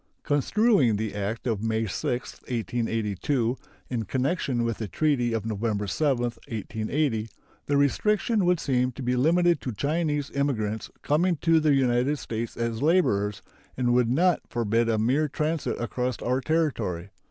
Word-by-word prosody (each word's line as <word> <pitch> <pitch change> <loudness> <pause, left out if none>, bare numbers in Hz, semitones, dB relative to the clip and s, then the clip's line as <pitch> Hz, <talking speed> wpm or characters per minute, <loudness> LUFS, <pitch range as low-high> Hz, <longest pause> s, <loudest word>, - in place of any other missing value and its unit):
Construing 145 - +3
the 110 0 -3
act 105 +3 -3
of 110 -5 -1
May 110 0 0
6, 120 +4 -3
1882, 115 +2 -1 0.3
in 115 -3 -2
connection 130 - 0
with 115 -2 -2
the 110 - -3
treaty 125 - +1
of 110 -2 -2
November 105 -1 -1
7, 125 - +1
1880, 115 +1 -2 0.4
the 145 - +2
restriction 210 - +2
would 175 -1 +3
seem 125 -1 +1
to 130 - -7
be 125 +1 +1
limited 170 +5 +3
to 125 - -3
Chinese 145 +4 -1
immigrants 110 -7 -1
coming 170 +5 +2
to 165 -1 +4
the 155 -2 +3
United 130 +2 +2
States 115 -3 -5
as 115 -1 -2
laborers, 105 - +2 0.3
and 125 -1 +2
would 125 -2 +3
not 170 +7 +3
forbid 115 0 +1
a 110 - +2
mere 130 +8 +2
transit 155 +2 -2
across 125 0 -2
our 130 +2 +1
territory. 115 - -1
125 Hz, 150 wpm, -26 LUFS, 110-150 Hz, 0.4 s, to